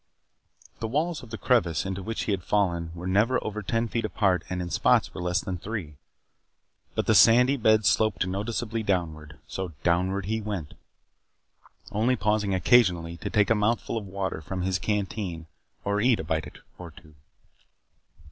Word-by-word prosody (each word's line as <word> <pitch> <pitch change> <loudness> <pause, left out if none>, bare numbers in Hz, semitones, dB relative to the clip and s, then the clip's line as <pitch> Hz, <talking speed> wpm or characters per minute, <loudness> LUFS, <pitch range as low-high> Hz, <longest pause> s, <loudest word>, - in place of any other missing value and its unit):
The 115 - -2
walls 155 +7 -1
of 120 - -12
the 110 - -6
crevice 95 - +1
into 95 0 -3
which 110 +4 -3
he - - -2
had 95 -2 -1
fallen 85 -5 0
were 85 +1 -7
never 105 +7 +2
over 105 0 -3
ten 115 +3 -1
feet 115 +1 -2
apart 95 -5 +1
and 90 - -3
in 90 -1 -4
spots - - +2
were - - -6
less 90 +1 0
than 90 -2 -5
three. 90 -8 -6 1.0
But - - 0
the - - +3
sandy 125 +4 +6
bed 110 -4 +3
sloped 100 -1 +2
noticeably 110 +4 -3
downward, 80 -7 -2
so 95 -3 -5
downward 90 +3 +1
he 110 +2 -1
went. 100 -8 -5 1.2
Only 110 +5 +2
pausing 105 -3 0
occasionally 90 -6 +3
to - - -5
take 105 +1 +2
a - - +8
mouthful 110 +2 0
of 110 -3 -4
water 95 -4 -3
from 90 +4 -4
his 95 0 0
canteen 95 -3 -3 0.4
or 100 +1 0
eat 120 0 +3
a - - -3
bite 80 0 -2 0.3
or 90 -1 -8
two. 80 -1 -17
100 Hz, 170 wpm, -26 LUFS, 90-110 Hz, 1.2 s, a